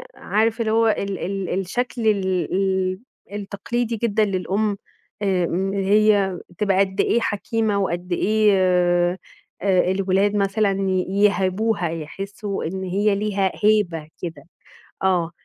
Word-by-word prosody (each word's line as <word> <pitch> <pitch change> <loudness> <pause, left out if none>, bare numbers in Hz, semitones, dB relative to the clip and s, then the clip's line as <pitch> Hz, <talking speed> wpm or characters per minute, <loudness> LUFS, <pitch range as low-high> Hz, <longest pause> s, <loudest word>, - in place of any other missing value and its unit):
عارفة 225 +2 0
اللي 220 - 0
هو 225 +1 +3
ال 200 -3 -1
ال 190 -1 -2
الشكل 230 +4 -2
ال 190 -4 0
ال 190 0 0 0.3
التقليدي 215 +4 -3
جدًا 215 -1 +1
للأم 200 +2 -1 0.4
آآ، 190 -3 +1
إن 190 +3 -1
هي 200 -1 +3 0.2
تبقى 195 -2 +1
قد 190 0 +2
إيه 235 - +2
حكيمة 220 0 -1
وقد 180 -1 -2
إيه 185 -3 +2 0.4
الولاد 195 +1 +2
مثلًا 200 +1 +1 0.2
ي 185 -1 +1 0.2
يِهابوها، 190 -1 +1
يحسوا 195 +6 -5
إن 190 +4 -4
هي 200 +3 +1
ليها 200 -2 0
هيبة 190 -8 +2
كده. 165 -5 -6 0.6
آه، 175 -3 +1
195 Hz, 120 wpm, -22 LUFS, 185-210 Hz, 0.6 s, هو